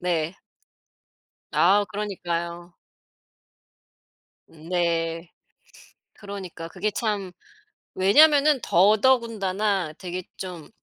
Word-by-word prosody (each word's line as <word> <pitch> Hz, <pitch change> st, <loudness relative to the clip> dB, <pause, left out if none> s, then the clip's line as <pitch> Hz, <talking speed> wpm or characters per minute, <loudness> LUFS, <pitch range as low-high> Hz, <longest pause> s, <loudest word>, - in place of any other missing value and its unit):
네. 170 Hz, 0 st, -2 dB, 1.1 s
아 200 Hz, +4 st, +4 dB
그러니까요. 175 Hz, -4 st, -4 dB, 1.7 s
네. 165 Hz, 0 st, -2 dB, 0.8 s
그러니까 195 Hz, -5 st, -8 dB
그게 190 Hz, +5 st, -2 dB
참 205 Hz, -4 st, -2 dB, 0.6 s
왜냐면은 285 Hz, +8 st, +5 dB
더더군다나 205 Hz, -3 st, +2 dB
되게 180 Hz, 0 st, -5 dB
좀 180 Hz, -5 st, -8 dB
185 Hz, 150 characters per minute, -24 LUFS, 170-210 Hz, 1.7 s, 왜냐면은